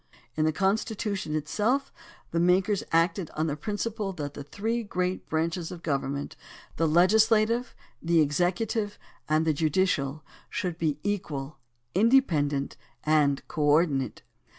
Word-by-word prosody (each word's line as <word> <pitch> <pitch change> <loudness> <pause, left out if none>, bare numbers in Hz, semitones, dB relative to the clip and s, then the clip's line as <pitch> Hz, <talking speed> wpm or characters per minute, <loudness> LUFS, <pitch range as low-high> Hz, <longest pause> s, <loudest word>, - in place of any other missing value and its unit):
In 155 - +1
the 155 - +3
Constitution 195 -1 -1
itself 215 - 0 0.4
the 170 - 0
makers 185 +3 +3
acted 165 +1 +2
on 155 - 0
the 150 -2 -1
principle 205 +3 -3
that 145 -4 -5
the 145 - -7
three 225 +10 -2
great 185 -3 -3
branches 165 +1 -1
of 175 -2 -9
government 140 -1 -2 0.2
— - - -22
the 165 - +2
legislative, 220 +7 +3 0.3
the 170 0 +3
executive, 185 - 0 0.3
and 155 +1 +3
the 160 - +3
judicial 155 -2 0
— - - -28
should 175 -2 -3
be 155 -3 0
equal, 155 -9 -3 0.3
inde 240 +7 +5
pendent, 145 -3 -1 0.3
and 150 -3 +2
co 155 - -4
ordinate. 145 -4 +2
170 Hz, 140 wpm, -27 LUFS, 150-205 Hz, 0.4 s, inde